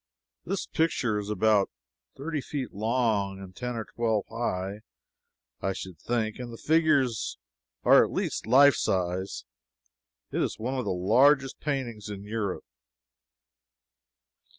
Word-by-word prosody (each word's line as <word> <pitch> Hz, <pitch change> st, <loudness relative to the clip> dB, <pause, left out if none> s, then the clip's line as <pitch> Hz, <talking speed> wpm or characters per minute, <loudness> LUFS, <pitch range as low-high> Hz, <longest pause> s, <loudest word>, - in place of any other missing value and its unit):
This -, -, -2 dB
picture 125 Hz, -9 st, 0 dB
is 105 Hz, 0 st, -5 dB
about 105 Hz, -1 st, +3 dB, 0.5 s
thirty 150 Hz, +2 st, -3 dB
feet 135 Hz, -4 st, -5 dB
long, 105 Hz, -3 st, 0 dB
and 95 Hz, -1 st, -10 dB
ten 125 Hz, -1 st, -4 dB
or 110 Hz, -2 st, -3 dB
twelve 110 Hz, -3 st, -1 dB
high, 100 Hz, -3 st, -2 dB, 0.8 s
I 95 Hz, -, 0 dB
should 95 Hz, -4 st, -8 dB
think, 115 Hz, -2 st, -1 dB
and 120 Hz, -1 st, -6 dB
the 115 Hz, -, -8 dB
figures 150 Hz, -8 st, +2 dB, 0.5 s
are -, -, +7 dB
at -, -, -3 dB
least -, -, -2 dB
life 140 Hz, +4 st, +7 dB
size. 95 Hz, -2 st, -1 dB, 0.9 s
It -, -, 0 dB
is -, -, -1 dB
one 125 Hz, +4 st, -3 dB
of 130 Hz, -2 st, -2 dB
the -, -, 0 dB
largest 130 Hz, +9 st, +3 dB
paintings 120 Hz, -8 st, -3 dB
in 100 Hz, -1 st, -6 dB
Europe. 105 Hz, -2 st, -3 dB
115 Hz, 130 wpm, -28 LUFS, 100-130 Hz, 0.9 s, are